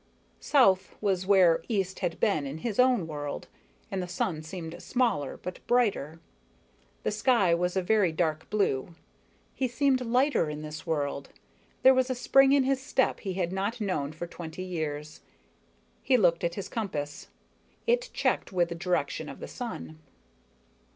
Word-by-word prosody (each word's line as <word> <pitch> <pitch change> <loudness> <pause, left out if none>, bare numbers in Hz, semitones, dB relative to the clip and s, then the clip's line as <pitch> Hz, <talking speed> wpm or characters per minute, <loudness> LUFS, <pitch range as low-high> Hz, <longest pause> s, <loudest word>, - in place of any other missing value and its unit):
South 195 -10 +3
was 190 -3 0
where 180 -5 +5
east 195 -4 -1
had 175 -3 -2
been 155 -10 +1
in 140 +3 -5
his 225 -2 -2
own 250 -7 +4
world, 145 -2 -5 0.4
and 195 -1 -1
the 180 - -4
sun 175 -2 -2
seemed 170 +1 -7
smaller, 235 - 0
but 180 - -7
brighter. 200 - +1 0.8
The - - 0
sky 210 -4 +3
was 180 +2 0
a 190 - +1
very 200 -2 +3
dark 160 -1 -1
blue. 170 -6 0 0.6
He 260 - -1
seemed 260 +1 +2
lighter 250 - +2
in 150 0 -6
this 155 +3 -8
world, 140 -3 -2 0.5
there 265 - +8
was 260 0 +2
a 255 - 0
spring 270 +2 +5
in 280 -1 +5
his 265 0 +1
step 265 -1 +1
he 190 -3 -4
had 180 -2 -1
not 200 +5 -2
known 170 -9 -1
for 160 +2 -6
twenty 170 0 -7
years. 155 -4 -4 0.8
He 260 - +3
looked 175 -6 +3
at 170 0 -1
his 200 - -5
compass. 150 -10 -4 0.6
It 485 +1 +1
checked - - 0
with 175 -2 +1
the - - -3
direction 175 +1 -2
of - - -9
the - - -7
sun. 230 - -7
185 Hz, 165 wpm, -28 LUFS, 160-240 Hz, 0.8 s, there